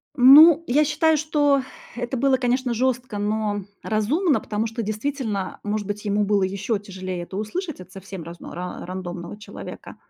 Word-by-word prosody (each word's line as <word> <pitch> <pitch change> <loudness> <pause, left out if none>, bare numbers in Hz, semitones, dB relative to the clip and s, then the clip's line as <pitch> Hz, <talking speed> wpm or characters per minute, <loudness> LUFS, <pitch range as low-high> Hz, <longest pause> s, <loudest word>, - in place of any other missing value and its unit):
Ну, 295 +6 +8
я 290 +5 +4
считаю, 310 +2 +2
что 290 -2 +2 0.3
это 245 +1 -3
было, 270 +1 +3
конечно, 250 0 0
жёстко, 245 -3 -1
но 210 -1 -1 0.2
разумно, 275 - +1
потому 220 +1 -2
что, 225 +1 -4
действительно, 215 -2 -3
может 210 -1 -2
быть, 205 0 -4
ему 205 0 +1
было 200 -1 +2
ещё 200 +4 -1
тяжелее 185 -3 -6
это 190 +2 -7
услышать 315 - -4
от 185 0 -12
совсем 190 -2 -8
рас 170 +2 -9
ра 180 0 -6
рандомного 180 0 -6
человека. 210 - -10
215 Hz, 160 wpm, -23 LUFS, 200-265 Hz, 0.3 s, Ну